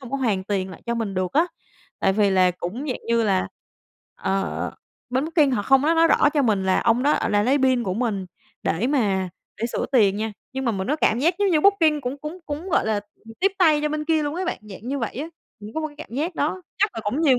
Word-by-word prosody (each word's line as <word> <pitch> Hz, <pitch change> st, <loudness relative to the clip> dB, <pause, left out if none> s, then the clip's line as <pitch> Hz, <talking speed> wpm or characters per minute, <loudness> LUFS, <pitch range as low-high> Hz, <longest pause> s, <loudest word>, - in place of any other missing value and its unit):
không 255 Hz, -2 st, -10 dB
có 275 Hz, -, -1 dB
hoàn 215 Hz, -8 st, 0 dB
tiền 190 Hz, -2 st, -2 dB
lại 170 Hz, -, -12 dB
cho 235 Hz, -, 0 dB
mình 220 Hz, -4 st, -3 dB
được 185 Hz, -1 st, -1 dB
á, 325 Hz, +4 st, +3 dB, 0.5 s
tại 190 Hz, -, +3 dB
vì 205 Hz, 0 st, +3 dB
là 185 Hz, -1 st, +4 dB
cũng, 180 Hz, -, -5 dB
dạng 255 Hz, -, -3 dB
như 230 Hz, 0 st, +2 dB
là, 195 Hz, -4 st, +1 dB, 0.7 s
ờ, 195 Hz, 0 st, -2 dB, 0.4 s
bên 260 Hz, +3 st, +1 dB
Booking 315 Hz, -3 st, +3 dB
họ 225 Hz, -6 st, 0 dB
không 270 Hz, +4 st, +4 dB
có 320 Hz, +3 st, +3 dB
nói 330 Hz, 0 st, +5 dB
rõ -, -, +5 dB
cho 290 Hz, -, +3 dB
mình 210 Hz, -5 st, +1 dB
là 190 Hz, -, +3 dB
ông 235 Hz, +2 st, +2 dB
đó, 290 Hz, +2 st, +3 dB
ờ, -, -, 0 dB
là 205 Hz, 0 st, +2 dB
lấy 265 Hz, +5 st, +3 dB
pin 260 Hz, -2 st, +3 dB
của 185 Hz, -, -1 dB
mình 210 Hz, -5 st, -1 dB, 0.4 s
để 175 Hz, +9 st, 0 dB
mà 200 Hz, -9 st, +1 dB, 0.3 s
để 230 Hz, -, +1 dB
sửa -, -, -1 dB
tiền 205 Hz, -6 st, +4 dB
nha, 220 Hz, 0 st, -2 dB, 0.2 s
nhưng 265 Hz, 0 st, -3 dB
mà 235 Hz, -, +1 dB
mình 190 Hz, -2 st, -3 dB
có 300 Hz, -, +1 dB
cảm 235 Hz, -6 st, +2 dB
giác 335 Hz, +6 st, +2 dB
giống 405 Hz, -1 st, +2 dB
như 310 Hz, -3 st, +3 dB
Booking 325 Hz, -6 st, +4 dB
cũng 260 Hz, +3 st, -4 dB
cũng 305 Hz, +5 st, -7 dB
cũng, 300 Hz, +6 st, -5 dB
gọi -, -, +2 dB
là, 220 Hz, -, +1 dB, 0.3 s
ừm, 225 Hz, 0 st, -12 dB
tiếp 390 Hz, +1 st, +3 dB
tay 310 Hz, -4 st, +5 dB
cho 300 Hz, -, +1 dB
bên 305 Hz, 0 st, -3 dB
kia 315 Hz, -1 st, +2 dB
luôn 290 Hz, +1 st, -2 dB
á 370 Hz, -, -2 dB
bạn, 360 Hz, -, -2 dB
dạng 210 Hz, +2 st, -10 dB
như 280 Hz, +1 st, -1 dB
vậy 230 Hz, -4 st, -3 dB
á. 295 Hz, +5 st, -4 dB, 0.3 s
Mình 210 Hz, +1 st, -9 dB
có 315 Hz, -, -1 dB
một 310 Hz, -, -1 dB
cái 295 Hz, -, -18 dB
cảm 235 Hz, -, -9 dB
giác 320 Hz, +5 st, -2 dB
đó, 335 Hz, +6 st, -1 dB, 0.2 s
chắc 415 Hz, +2 st, +3 dB
là 225 Hz, -, -4 dB
cũng 250 Hz, +9 st, -1 dB
nhiều 275 Hz, -6 st, +4 dB
255 Hz, 275 wpm, -23 LUFS, 205-300 Hz, 0.7 s, nói